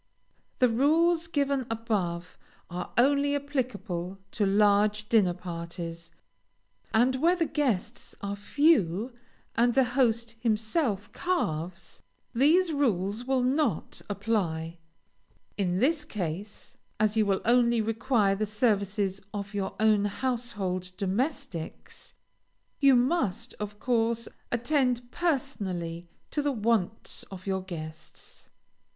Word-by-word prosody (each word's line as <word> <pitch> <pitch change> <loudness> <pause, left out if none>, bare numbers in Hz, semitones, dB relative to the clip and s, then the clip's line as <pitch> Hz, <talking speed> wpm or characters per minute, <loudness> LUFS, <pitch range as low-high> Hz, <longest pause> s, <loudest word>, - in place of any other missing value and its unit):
The 250 - +5
rules 320 +7 +3
given 280 -5 0
above 200 -7 -2 0.4
are 180 0 -5
only 285 +3 +4
applicable 230 -10 -3
to 210 - 0
large 210 +1 +3
dinner 195 -6 +4
parties, 170 -1 -6 0.8
and 245 +4 +3
where 335 +6 +4
the 340 -2 +1
guests 265 -12 -2
are 200 0 -3
few, 225 - +2 0.4
and 240 +1 +3
the 265 - +6
host 235 -2 +1
himself 220 - 0
carves, 175 - -2 0.3
these 320 +8 +4
rules 220 -5 0
will 260 -1 +1
not 260 - 0
apply. 175 -6 -1 0.8
In 180 -3 0
this 295 - +2
case, 200 - -5 0.2
as 215 0 +2
you 215 -2 +3
will 195 -1 +1
only 235 0 +4
require 225 -1 +2
the 215 +1 -1
services 200 -3 0
of 205 0 -5
your 200 -1 -2
own 215 -2 +4
household 205 -5 -2
domestics, 210 - -3 0.6
you 275 -2 +6
must, 245 - +1
of 210 0 -5
course, 230 -1 +1 0.2
attend 245 -1 +1
personally 190 - -2 0.2
to 295 - 0
the 290 0 +1
wants 220 -3 -1
of 185 -1 -9
your 190 -1 -1
guests. 160 -4 -9
220 Hz, 110 wpm, -28 LUFS, 195-260 Hz, 0.8 s, the